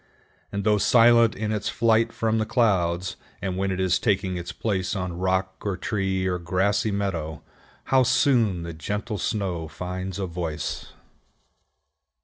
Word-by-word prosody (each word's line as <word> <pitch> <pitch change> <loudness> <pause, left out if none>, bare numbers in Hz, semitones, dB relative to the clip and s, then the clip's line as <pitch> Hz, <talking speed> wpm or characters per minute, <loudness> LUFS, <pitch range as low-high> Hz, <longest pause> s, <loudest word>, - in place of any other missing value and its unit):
And 100 0 -3
though 105 0 +3
silent 115 0 +5
in 105 +1 -2
its 105 -1 -1
flight 115 0 +2
from 110 -1 0
the 110 - 0
clouds, 95 -6 +1 0.2
and 95 -1 -3
when 95 +1 -1
it 95 -1 -2
is 95 -1 +2
taking 95 -3 0
its 85 -1 -5
place 95 -3 -2
on 90 -2 -3
rock, 95 0 0
or 100 -3 -2
tree, 95 -3 -1
or 90 -1 0
grassy 95 +5 +1
meadow, 95 -6 -3 0.4
how 130 -1 +3
soon 120 - +2
the 85 0 -6
gentle 105 +6 -4
snow 90 -6 -2
finds 90 +3 -5
a 100 - -2
voice! 85 -4 -4
95 Hz, 150 wpm, -25 LUFS, 90-110 Hz, 0.4 s, silent